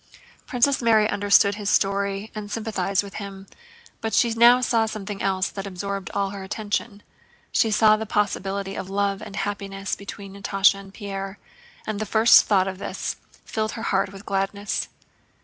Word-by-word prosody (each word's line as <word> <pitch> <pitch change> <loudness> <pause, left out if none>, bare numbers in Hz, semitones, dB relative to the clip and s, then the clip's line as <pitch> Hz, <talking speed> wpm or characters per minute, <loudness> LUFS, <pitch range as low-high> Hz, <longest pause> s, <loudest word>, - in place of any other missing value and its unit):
Princess 260 +3 +2
Mary 220 -2 +4
understood 200 0 +4
his 205 0 -3
story 200 +1 0
and 210 -1 -6
sympathized 205 -3 -1
with 200 - -10
him, 195 -1 -8 0.6
but 220 -2 -1
she 235 -2 +3
now 240 +2 +7
saw 230 -3 +2
something 205 -2 -6
else 190 -1 +1
that 195 0 -6
absorbed 195 +1 -4
all 200 -1 0
her 200 -1 -7
attention. 205 +1 -3 0.5
She 225 - +3
saw 215 0 +5
the 220 0 -5
possibility 195 -1 -1
of 190 - -6
love 200 0 0
and 200 - -8
happiness 200 -1 -3
between 200 0 -9
Natásha 195 0 +3
and 195 0 -12
Pierre, 195 -1 -6 0.5
and 215 -2 -3
the 215 - -3
first 220 +3 +6
thought 195 -3 +3
of 190 0 -5
this - - -4 0.3
filled 220 0 -2
her 225 - -6
heart 195 -2 0
with 200 +1 -12
gladness. 200 +1 -2
200 Hz, 165 wpm, -24 LUFS, 195-215 Hz, 0.6 s, now